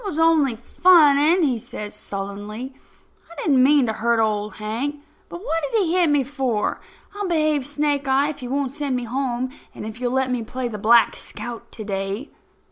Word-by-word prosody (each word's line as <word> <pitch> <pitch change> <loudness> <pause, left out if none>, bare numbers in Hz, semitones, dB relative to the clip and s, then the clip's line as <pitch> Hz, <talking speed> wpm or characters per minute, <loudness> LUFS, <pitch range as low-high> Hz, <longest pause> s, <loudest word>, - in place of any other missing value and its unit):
"I - - -4
was 315 - -4
only 320 -6 +3
funning," 300 0 +4
says 210 -1 -8
he - - -6
sullenly. 205 +6 -6 0.6
"I - - -12
didn't 275 -5 +4
mean 280 0 +5
to 220 - -1
hurt 235 +1 +1
Old 210 -1 0
Hank. 225 +7 -3 0.3
But 345 - -8
what 330 -8 -1
did 460 - +2
he 335 -1 -1
hit 355 -3 +3
me 290 -2 +3
for? 260 -5 -2 0.3
I'll 410 -1 -3
behave, 310 -5 +1
Snake 290 -1 -1
eye, 275 +2 +3
if 290 -2 -7
you 250 - -6
won't 275 -1 -1
send 285 -3 -2
me 250 - -2
home, 255 +1 -2 0.2
and - - -7
if 220 +3 -8
you'll 245 -1 0
let 265 0 0
me 250 -2 -1
play 250 +3 -4
the 215 -3 -6
Black 230 +3 +5
Scout 235 +2 -8
to 220 - -7
day." 200 +5 -4
260 Hz, 200 wpm, -22 LUFS, 225-295 Hz, 0.6 s, mean